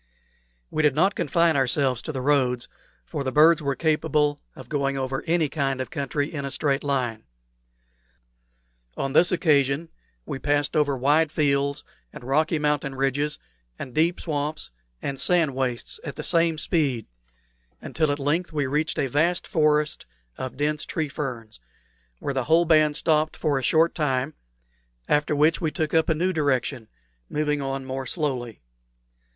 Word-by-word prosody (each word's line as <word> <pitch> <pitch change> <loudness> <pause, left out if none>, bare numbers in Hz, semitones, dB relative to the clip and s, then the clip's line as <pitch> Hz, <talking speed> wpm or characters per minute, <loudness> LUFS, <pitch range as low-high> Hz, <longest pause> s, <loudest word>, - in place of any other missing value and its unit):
We 155 - 0
did 150 -3 +3
not 190 +6 +3
confine 170 -4 +2
ourselves 130 -2 +1
to - - -5
the 135 -3 -4
roads, 130 -4 +1 0.4
for 140 - -4
the 130 - -2
birds 155 +3 +5
were 140 -2 -1
capable 150 -2 +1
of - - -11
going 140 -2 -1
over 135 0 -3
any 165 -1 +2
kind 135 -2 -1
of 130 - -4
country 145 0 -2
in 140 -2 -4
a 140 - -3
straight 140 0 0
line. 125 -6 -1 1.7
On 135 0 -2
this 175 +5 +5
occasion 150 -2 +2 0.4
we 135 - -5
passed 145 +2 0
over 145 -3 +2
wide 145 +4 +3
fields 140 -1 0 0.3
and - - -11
rocky 155 +5 +1
mountain 150 -2 -1
ridges 135 +2 0 0.4
and 125 - -7
deep 165 +5 +2
swamps 150 - -3 0.3
and 135 -1 -2
sand 170 -6 +3
wastes 130 - -3
at - - -6
the - - -6
same 165 -2 +2
speed, 140 - 0 0.7
until 155 -2 -1
at 145 - -1
length 150 +6 -1
we 150 -3 -1
reached 150 +4 -1
a - - +1
vast 160 +7 +1
forest 150 - +1 0.3
of 130 0 -6
dense 150 +1 0
tree 155 -2 -3
ferns, 120 - -6 0.6
where 140 - -3
the 130 -2 -1
whole 165 +2 +4
band 155 -2 +4
stopped 155 0 +1
for 145 -4 0
a - - -7
short 160 +6 +3
time, 135 -1 -1 0.7
after 150 0 +1
which 155 +4 +3
we 160 - +1
took 155 0 -3
up 160 0 +3
a 160 - +2
new 180 +4 0
direction, 130 -6 -1 0.4
moving 150 -1 -1
on 135 0 -3
more 130 0 -4
slowly. 125 - -3
145 Hz, 160 wpm, -25 LUFS, 135-155 Hz, 1.7 s, birds